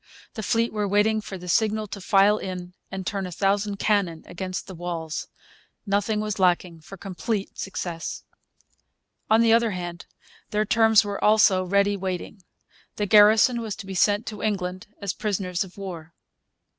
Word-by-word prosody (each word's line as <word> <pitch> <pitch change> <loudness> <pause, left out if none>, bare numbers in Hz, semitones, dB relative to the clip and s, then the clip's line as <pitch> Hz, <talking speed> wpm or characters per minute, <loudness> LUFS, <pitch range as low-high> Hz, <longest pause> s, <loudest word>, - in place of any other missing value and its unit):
The 220 - -5
fleet 230 +2 0
were 210 -1 -1
waiting 210 +2 +2
for 195 -2 -7
the 180 0 -10
signal 215 +3 +1
to 200 - -7
file 200 +3 +4
in 180 -1 -6 0.2
and 190 -1 -6
turn 195 -1 -2
a - - -8
thousand 200 +2 0
cannon 195 -7 0
against 185 +1 -5
the 190 - -9
walls. 170 -2 -4 0.6
Nothing 205 +1 0
was 210 -1 -3
lacking 180 -2 +1
for 195 +5 -11
complete 195 +3 -4
success. 175 -3 -5 1.1
On 220 +1 +5
the 230 -1 +5
other 230 0 +4
hand, 175 -3 -6 0.4
their 215 0 0
terms 220 0 +5
were 205 -1 -4
also 210 -3 +5
ready 200 +2 +2
waiting. 190 +1 -5 0.5
The 210 - -1
garrison 215 +4 +6
was 220 -4 -4
to 200 - -9
be 195 - -6
sent 205 +3 +2
to 215 - -6
England 185 -3 -2
as 200 -3 -2
prisoners 190 -4 -2
of 190 0 -14
war. 170 -4 -8
200 Hz, 165 wpm, -25 LUFS, 180-215 Hz, 1.1 s, garrison